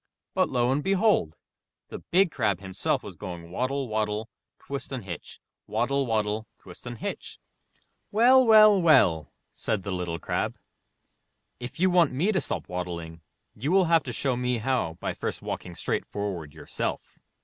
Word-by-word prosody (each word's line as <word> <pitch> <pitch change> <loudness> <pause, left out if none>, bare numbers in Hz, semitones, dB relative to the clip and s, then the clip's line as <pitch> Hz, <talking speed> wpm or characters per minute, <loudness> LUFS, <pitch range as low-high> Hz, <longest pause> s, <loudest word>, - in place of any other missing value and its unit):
But - - +2
lo 125 -1 +1
and 145 +2 0
behold! 195 - +2 0.5
the - - -7
Big 185 0 +2
Crab 105 -9 0
himself 95 -1 -2
was - - -9
going 85 -2 -8
waddle, 130 +5 -1
waddle, 110 0 -2 0.3
twist 140 -1 -7
and 130 -4 -4
hitch! 85 -5 -8 0.3
waddle, 135 +5 0
waddle, 110 -1 -1
twist - - -13
and 120 -1 -6
hitch! - - -6 0.7
''Well, 250 +5 +6
well, 215 -4 +7
well!'* 85 - +4 0.2
said 105 -3 -2
the 100 - -4
Little 90 -2 -2
Crab, - - -2 1.0
*'if 125 +5 -8
you 185 +1 +4
want 175 -6 +4
me 170 +11 +1
to 190 - +1
stop - - -4
waddling, 85 -2 -5 0.3
you 135 +9 -3
will 190 0 +5
have 165 -1 +4
to 125 - -4
show 130 +2 -1
me 125 0 0
how 115 -9 -1
by - - -2
first - - -5
walking 90 - -5
straight - - -2
forward 95 -7 -4
yourself! 75 - -5
120 Hz, 160 wpm, -27 LUFS, -, 1.0 s, well